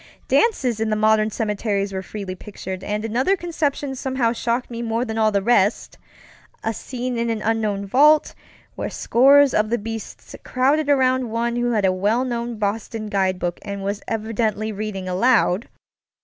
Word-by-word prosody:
Dances 260 - +2
in 220 0 0
the 215 - +1
modern 215 0 +3
cemeteries 205 -2 -2
were 190 - -3
freely 195 -1 -6
pictured, 190 -1 -8
and 210 +1 -3
another 260 - +1
conception 300 -5 -2
somehow 260 -3 -1
shocked 240 +1 -2
me 235 0 -5
more 230 +1 -1
than 225 -1 -3
all 215 -1 +3
the 200 -1 +1
restŌĆöa 225 +1 -2
scene 250 0 -4
in 235 0 0
an 225 -2 -2
unknown 215 -3 0
vault, 295 +9 +4 0.4
where - - -4
scores 275 +3 +4
of 215 0 +2
the 240 - +1
beasts 225 0 -7
crowded 280 +4 +1
about 260 -2 +3
one 235 +1 -2
who 240 0 0
held 210 -3 +2
a 190 - +4
well 210 +7 +1
known 235 -2 -3
Boston 215 +1 -3
guidebook 185 -3 -1
and 200 -1 -6
was 200 +1 -3
evidently 220 -1 -1
reading 200 -2 -5
aloud. 205 +1 +2
225 Hz, 165 wpm, -22 LUFS, 205-245 Hz, 0.4 s, vault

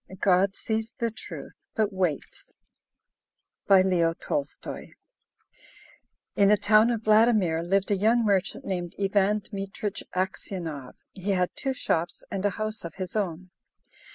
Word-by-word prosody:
GOD 190 0 +3
SEES 220 +1 -2
THE 230 -1 -1
TRUTH, - - -10
BUT 215 -2 +1
WAITS 180 -6 -3 1.1
BY 195 -1 +7
LEO 180 -3 +3
N. 165 - -5
TOLSTOY 290 -2 -4 1.4
In 200 - +5
the 210 - +6
town 215 +3 +5
of 230 -2 -1
Vladimir 215 -7 +4
lived 195 +4 +1
a - - +4
young 225 +4 +3
merchant 195 -3 0
named 175 -3 -3
Ivan 200 +1 +2
Dmitrich 200 0 -5
Aksionov. 175 -7 -4 0.2
He 195 +1 -2
had 180 -1 +1
two 270 -1 -2
shops 170 -9 -2
and 195 -1 -2
a 205 - +3
house 215 0 -3
of 170 -2 -7
his 185 0 -6
own. 185 -3 -2
195 Hz, 140 wpm, -27 LUFS, 180-215 Hz, 1.4 s, BY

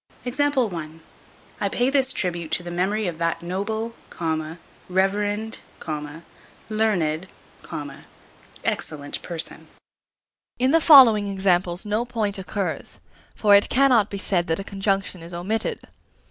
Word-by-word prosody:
I 210 - -3
pay 245 +2 +2
this 270 -2 +3
tribute 175 -8 -2
to 175 - +1
the 175 - -6
memory 195 +5 0
of 170 -3 -3
that 165 0 -1
noble, 220 +6 -3 1.0
reverend, 205 +4 0 1.1
learned, 190 -7 0 1.4
excellent 145 -2 -3
person. 170 -2 -4 0.9
In 255 +2 +2
the 330 +1 +5
following 245 -10 +8
examples 185 -1 +1
no 210 +3 0
point 215 -5 -2
occurs; 190 0 -3 0.4
for 205 -2 +4
it 200 0 +6
cannot 250 -5 +4
be 200 - -5
said 185 -3 0
that 160 0 0
a - - -4
conjunction 195 -2 -2
is 170 +1 -8
omitted. 210 +6 -2
200 Hz, 115 wpm, -24 LUFS, 175-220 Hz, 1.4 s, following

